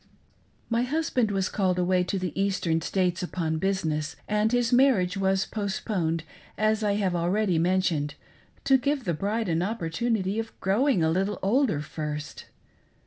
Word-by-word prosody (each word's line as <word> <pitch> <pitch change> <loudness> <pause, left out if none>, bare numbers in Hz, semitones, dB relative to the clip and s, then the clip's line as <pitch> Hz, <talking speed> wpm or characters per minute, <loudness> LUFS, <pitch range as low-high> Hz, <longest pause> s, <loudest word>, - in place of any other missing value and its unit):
My 230 0 +1
husband 255 -3 0
was 195 -1 0
called 185 -3 0
away 180 0 +2
to 195 - -2
the 185 -4 -3
Eastern 190 -4 0
States 180 +1 0
upon 165 -3 -2
business, 160 -5 -1
and 210 +1 +1
his 245 -1 +1
marriage 240 -9 +4
was 195 0 +1
'postponed, 190 -5 -2 0.3
as 215 0 +1
I 205 -1 +2
have 195 -3 0
already 180 +1 +1
mentioned, 170 -5 +1 0.5
to 270 -1 +4
give 280 +1 0
the 175 - -1
bride 210 +7 -1
an 165 -1 +1
opportunity 200 +2 -1
of 225 0 -6
growing 205 - +2
a 160 - +2
little 195 +4 0
older 210 - +2
first. 150 -1 -6
190 Hz, 150 wpm, -26 LUFS, 170-220 Hz, 0.5 s, marriage